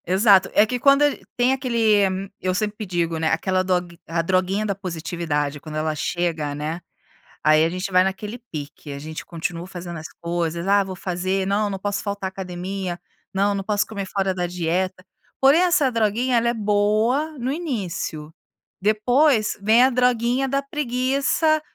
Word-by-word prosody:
Exato, 190 +1 +5
é 210 - +6
que 250 +3 -3
quando 275 +2 +5
a 290 - +4
g - - -10 0.2
tem 245 +2 +3
aquele 215 -7 +1
eu 185 0 -1
sempre 210 +2 -2
digo, 170 -2 -1
né, 160 - 0
aquela 185 -1 +1
dog 180 -2 -1
a 165 +1 0
"droguinha 190 +4 +1
da 200 - 0
positividade". 165 -5 -3
Quando 155 +1 -9
ela 155 0 0
chega, 155 -2 -2
né, 155 +4 -4 0.6
aí 155 +1 +5
a - - +1
gente 185 +3 -4
vai 185 0 +5
naquele 205 +4 -3
pique, 145 -1 -7
a 140 - -6
gente 155 +2 -7
continua 170 0 -4
fazendo 175 -2 -7
as 160 +1 -7
coisas, 170 0 -2
“Ah, 200 0 +4
vou 190 -1 -6
fazer", 185 +1 -2
"Não, 205 +1 +1
não 195 - -4
posso 200 +1 -2
faltar 200 -2 -3
a - - -3
academia", 185 -1 -5 0.3
"Não, 200 +1 +2
não 195 - -3
posso 210 +1 +1
comer 200 -3 -5
fora 195 0 -1
da 180 -1 -2
dieta.”, 180 +2 -2 0.4
porém, 275 +5 +6
essa 340 -7 +3
droguinha 230 +2 +1
ela 235 0 +2
é - - +1
boa 215 +8 +1
no 250 +2 -1
início. 190 - -4 0.5
Depois 220 +4 +2
vem 220 +4 +5
a 260 - +5
droguinha 250 +1 +2
da 275 +1 0
preguiça 275 +3 +1
195 Hz, 175 wpm, -22 LUFS, 175-235 Hz, 0.6 s, é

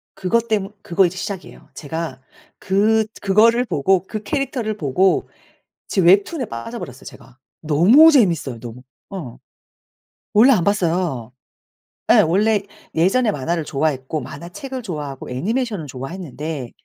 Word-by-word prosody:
그것 230 +5 0
때문 205 -2 -1
그거 185 +2 +2
이제 180 +2 -3
시작이에요. 200 -3 -7
제가 155 -3 -5 0.4
그 215 +3 +2 0.2
그거를 230 +5 +4
보고 185 +1 +1
그 215 -1 -5
캐릭터를 245 -3 -2
보고 180 +5 +1 0.6
지금 185 -4 +2
웹툰에 205 - +3
빠져 160 - -7
버렸어요 125 - -9
제가. 130 0 -14 0.2
너무 190 - +6
재밌어요 165 - +2
너무. 120 +1 -9 0.3
어. 165 -12 -7 0.9
원래 235 +6 +6
안 185 -7 +3
봤어요. 170 - -1 0.8
예. - - +6
원래 205 +5 +2 0.3
예전에 210 +8 +2
만화를 165 +3 -2
좋아했고 145 0 -2
만화책을 175 - -7
좋아하고 150 - -6
애니메이션을 205 - -2
좋아했는데 145 -1 -6
185 Hz, 315 characters per minute, -20 LUFS, 145-215 Hz, 0.9 s, 너무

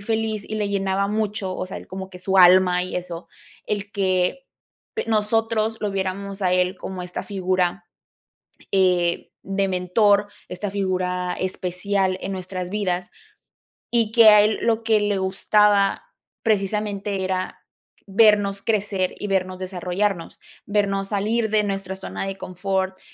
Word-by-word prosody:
feliz 220 0 -2
y 215 - -4
le 205 -1 -1
llenaba 195 0 0
mucho, 210 -3 -2
o - - -4
sea, 190 - -7
él - - -9
como 190 0 -7
que 180 - -10
su 190 +1 -1
alma 180 0 +6
y 185 - -4
eso, 175 -1 -6 0.4
el 205 -1 -3
que 190 +6 0 0.6
nosotros 225 0 +1
lo 210 -2 -1
viéramos 195 +1 -3
a 180 -1 +2
él 180 +1 +1
como 185 0 -6
esta 180 0 -5
figura, 185 -2 -1 0.9
eh, 180 -3 +2
de 195 0 -1
mentor, 200 +3 +2 0.2
esta 190 +3 -4
figura 180 -2 -1
especial 185 +1 -1
en 195 - -3
nuestras 185 -1 -5
vidas, 185 -3 -2 0.8
y 230 -2 +1
que 230 -2 +8
a 210 0 +8
él 215 0 +1
lo 230 -1 +1
que 220 -2 +3
le 205 -1 0
gustaba, 200 - +2 0.4
precisamente, 205 -2 -1
era 185 0 -2 0.5
vernos 200 -1 +3
crecer 205 -4 0
y 205 - -4
vernos 185 -1 -1
desarrollarnos, 185 0 -2 0.3
vernos 200 -1 0
salir 220 +2 0
de 215 0 +3
nuestra 195 -1 -3
zona 190 - -5
de 195 0 -4
confort, 190 +1 -2
195 Hz, 145 wpm, -23 LUFS, 185-210 Hz, 0.9 s, que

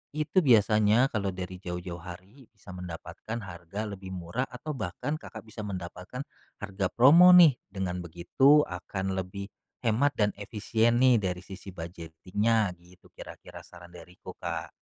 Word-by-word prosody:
itu 155 +5 +1
biasanya 110 - +4
kalau 100 -3 -1
dari 90 0 -6
jauh-jauh 90 -1 -6
hari 95 +9 -12
bisa 105 -4 -14
mendapatkan 90 +5 -7
harga 95 +3 -6
lebih 95 -2 -8
murah 90 +9 -3
atau 125 +5 -6
bahkan 125 - -4
Kakak 110 0 -10
bisa 110 0 -9
mendapatkan 95 +6 -6 0.4
harga 100 -1 -2
promo 160 +9 +7
nih, 160 -8 +7
dengan 95 -2 -3
begitu 90 - +3
akan 95 +1 -4
lebih 100 +2 -5 0.4
hemat 120 +6 +3
dan 105 -1 +2
efisien 110 +3 0
nih 125 -3 +6
dari 90 -1 -2
sisi 95 0 -10
budgeting-nya, 90 +6 -1
gitu 90 +1 -21
kira-kira - - -11
saran 85 0 -15
dariku, 90 +1 -12
Kak. 80 -2 -4
100 Hz, 140 wpm, -28 LUFS, 90-115 Hz, 0.4 s, promo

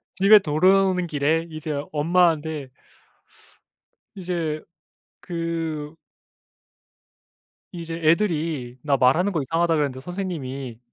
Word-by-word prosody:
집에 200 +2 +7
돌아오는 185 +3 +2
길에 160 +2 0
이제 155 0 -6 0.2
엄마한테 160 -3 +1 1.5
이제 170 -4 -3 0.6
그 165 -3 -4 1.8
이제 165 -2 -6
"애들이 155 -8 0
나 140 -2 +2
말하는 160 +11 +3
거 160 - 0
이상하다 165 +4 +1
그랬는데 140 -3 -1
선생님이 140 - -5
160 Hz, 215 characters per minute, -23 LUFS, 150-175 Hz, 1.8 s, 집에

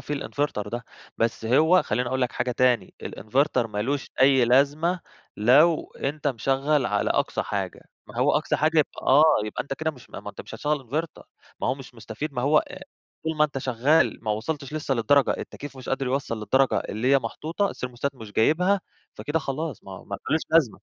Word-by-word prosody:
فيه 150 - -4
الinverter 140 -7 -3
ده. 120 +3 -5 0.3
بس 115 0 0
هو 160 +10 +4
خلّيني 125 0 -1
أقول 130 0 -1
لك 125 - 0
حاجة 125 +1 -1
تاني، 125 -5 +1
الinverter 130 +7 0
ما 105 -1 -3
لوش 140 +4 -2
أي 135 -2 +6
لازمة 145 +8 +2 0.4
لو 145 +10 +4
أنت 145 +2 -3
مشغّل 135 +3 +1
على - - 0
أقصى - - 0
حاجة. - - -4 0.3
ما - - -13
هو - - +3
أقصى - - -1
حاجة 155 +1 +2
يبقى 150 - 0
آه. 145 +4 +7 0.2
يبقى 105 - -3
أنت 135 - -5
كده 160 +3 -2
مش 130 -5 -17
ما - - -7
أنت - - -10
مش - - -10
هتشغّل 145 -4 -2
inverter. 155 +5 -3 0.4
ما - - -1
هو 130 - +1
مش 135 -2 -12
مستفيد، 115 +6 -6
ما 125 -2 -2
هو 150 +3 +4
آآ - - -5 0.4
طول 160 -1 -2
ما 150 - +5
أنت 145 -2 -3
شغّال 130 +2 +2
ما 110 - 0
وصلتش 140 +6 -3
لسّه 145 -3 -1
للدرجة 135 +4 +3
التكييف 145 -1 -8
مش 130 - -10
قادر 135 0 -1
يوصّل 130 -3 -2
للدرجة 130 +6 +2
اللي 120 +6 -1
هي 140 - +6
محطوطة، 160 - -2
الthermostat 125 +2 -4
مش 110 -5 -11
جايبها، 180 - +3 0.3
فكده 150 +2 -2
خلاص، 150 -2 -4
ما 95 - -9
ما 100 - -5
لهوش 160 - +3
لازمة 160 -8 +3
135 Hz, 195 wpm, -25 LUFS, 120-150 Hz, 0.4 s, آه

